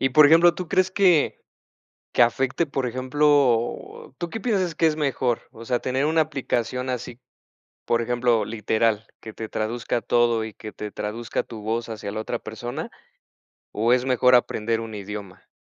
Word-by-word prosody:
y 135 - +3
por 150 +3 +7
ejemplo, 165 +3 +6
¿tú 180 -3 -6
crees 185 +2 +2
que 185 -6 +3 0.8
que - - +1
afecte, 135 +7 +1
por 135 -3 -2
ejemplo, 130 -1 +1
tú 175 - -3
qué 225 - -5
piensas 190 -7 0
que 165 - +2
es 155 -1 +1
mejor, 130 -5 0
o 115 - -12
sea, 125 +1 0
tener 130 +3 -1
una 160 +2 +2
aplicación 130 -4 -2
así, 125 -1 -5 0.7
por 115 - +1
ejemplo, 120 -2 +1
literal, 110 0 0
que 110 - -10
te 110 -1 -7
traduzca 115 +2 -2
todo 120 -2 +2
y 110 -1 -7
que 110 0 -9
te 105 -1 -7
traduzca 110 +2 -3
tu 110 -2 -10
voz 115 +2 -2
hacia 105 -2 -5
la 110 - -4
otra 120 - -3
persona, 120 - -6 0.8
o 115 +3 +1
es 125 0 +3
mejor 125 -1 +5
aprender 115 -1 0
un 115 -1 -7
idioma? 100 -2 -8
120 Hz, 175 wpm, -24 LUFS, 110-145 Hz, 0.8 s, por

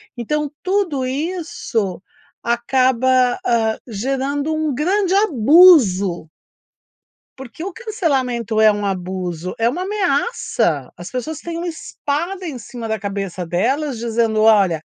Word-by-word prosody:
então 295 +5 -2
tudo 365 -8 0
isso 270 - -3 0.4
acaba, 255 +1 +2
hã, 225 -2 +1
gerando 270 +7 -2
um 310 -2 -1
grande 370 +6 +1
abuso. 255 - +5 1.1
Porque 265 +4 -9
o 385 +1 -5
cancelamento 265 - -1
é 220 0 +6
um 205 0 -3
abuso, 180 -2 -4
é 230 +1 +2
uma 345 +9 -3
ameaça. 280 - -1
As 175 +1 -8
pessoas 265 +5 -4
têm 340 -1 -6
uma 345 +1 -4
espada 340 +3 -4
em 300 -6 -5
cima 235 0 -7
da 220 0 -2
cabeça 195 -3 -4
delas 250 - -1
dizendo: 225 -1 0
"Olha, 200 -7 +4
255 Hz, 120 wpm, -19 LUFS, 215-315 Hz, 1.1 s, é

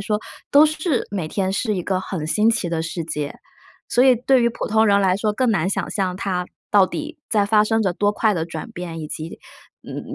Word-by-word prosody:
说， 210 +1 -1 0.3
都 290 +2 +8
是 310 -2 0
每 190 -6 -3
天 190 +3 -1
是 210 +2 0
一 180 - -2
个 185 0 -1
很 185 -4 -5
新 210 +7 +2
奇 205 -6 +1
的 165 -1 -1
世 165 +1 -4
界。 150 -2 -4 0.5
所 245 - +3
以 260 -1 +7
对 255 +2 +3
于 235 - +4
普 230 - -5
通 220 +1 +3
人 200 0 +4
来 190 -2 +3
说， 210 +1 0
更 250 +2 +1
难 190 -4 +1
想 - - -2
象 185 -3 -1
它 180 -2 -2 0.2
到 200 -2 +5
底 310 - -6
在 210 -3 +2
发 210 +1 +4
生 225 +1 +1
着 190 - +1
多 205 +3 +1
快 215 0 +2
的 165 -3 -1
转 175 +7 -7
变， 175 -5 -6
以 155 - -6
及， 160 +1 -7 0.4
嗯， - - -7
200 Hz, 250 characters per minute, -21 LUFS, 180-225 Hz, 0.5 s, 都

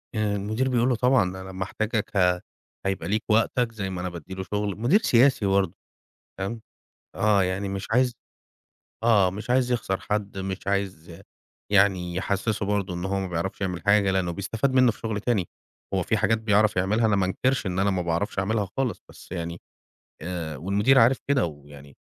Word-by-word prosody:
آآ 105 -1 0
المدير 110 +6 -1
بيقول 125 0 +2
له: 125 - +2
"طبعًا 125 +1 +3
أنا 95 +1 -6
محتاجك 105 +4 -2
ه 90 -1 +3 0.4
هيبقى 95 0 -2
ليك 105 +3 0
وقتك 115 +2 +2
زي 100 -4 -4
ما 90 -2 -4
أنا 90 - -2
بادّي 85 +1 -9
له 95 0 -4
شُغل." 105 0 -2
مدير 125 - +4
سياسي 130 - +4
برضه 95 -3 +2 0.7
تمام؟ 100 +4 -4 0.6
آه. 105 -2 +3
يعني 95 +2 -2
مش 95 0 -4
عايز 125 +1 +3 0.9
آه. 105 -5 +4
مش 105 +5 -7
عايز 125 0 +2
يخسر 100 -5 -1
حد، 105 -2 -3
مش 95 0 -5
عايز 95 -4 -3 0.5
يعني 95 -3 +3
يحسِّسه 100 +3 -1
برضه 100 -2 -1
إن 90 +1 -4
هو 95 0 -1
ما 95 - -3
بيعرفش 90 +2 -3
يعمل 90 -3 -3
حاجة، 100 -1 +4
لإنّه 95 -2 0
بيستفاد 110 +8 -1
منّه 130 -2 +5
في - - -17
شُغل 110 -2 -3
تاني. 105 -6 0 0.5
هو - - +1
في - - 0
حاجات 115 - +2
بيعرف 105 -1 +2
يعملها 105 +5 +2
أنا 105 - +2
ما 95 -2 +2
أنكِرش 130 +6 0
إن 90 -1 -2
أنا 100 +1 +2
ما 95 -2 0
باعرفش 85 +4 -2
أعملها 100 +1 0
خالص، 130 -7 -1
بس - - -14
يعني 85 -1 -4 0.6
آآ 80 -3 -4
والمدير 100 - +3
عارف 125 +3 +5
كده 140 -6 +3
ويعني 70 -2 -12
100 Hz, 185 wpm, -25 LUFS, 95-110 Hz, 0.9 s, منّه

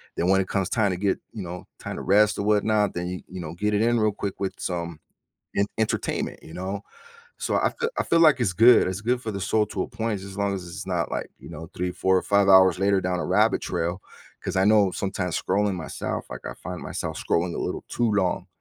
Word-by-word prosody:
then 85 - 0
when 95 0 +5
it 95 - -4
comes 95 -2 -1
time 105 -4 +2
to 90 - -2
get, 95 +1 0
you 105 - -5
know, 90 +1 -7
time - - -6
to - - -5
rest 105 +2 +4
or - - 0
whatnot, 105 0 +2
then 90 0 -3
you 90 0 -5
you 95 0 -7
know, 80 0 -6
get 105 +4 -1
it 105 - +2
in 120 0 +3
real 110 0 +3
quick 100 -1 -5
with 95 -1 -2
some 85 -3 -4 0.6
en 100 - +3
entertainment, 110 -1 -1
you 80 - -12
know? 95 +3 -4 0.6
So - - -2
I - - +2
feel 465 - 0
I - - +3
feel 165 - +3
like 155 -5 +6
it's 100 -7 +1
good, 115 +2 +6
it's 95 +2 -3
good 120 +3 0
for 110 - -3
the 100 - -4
soul 105 +3 +2
to 95 - -3
a - - -5
point 110 -3 -3
just 100 0 -9
as 100 - -10
long 100 -1 0
as 90 -2 -6
it's 85 - -7
not, - - -1
like, - - -3
you - - -12
know, 80 +4 -9
3, 90 0 -1
4 95 0 +2
or - - +1
5 100 -1 +3
hours 95 -2 +7
later 100 0 +3
down 90 -1 -1
a - - -2
rabbit - - +3
trail, 85 +3 -2 0.4
'cause - - -3
I 95 - +4
know 105 -2 +5
sometimes 95 -3 -2
scrolling 100 +1 +1
myself, 80 -4 -4
like, - - -8
I - - -5
find 90 0 -7
myself - - -4
scrolling 85 +1 0
a - - -4
little - - -3
too 120 -2 0
long. 95 -2 0
95 Hz, 255 wpm, -25 LUFS, 90-105 Hz, 0.6 s, hours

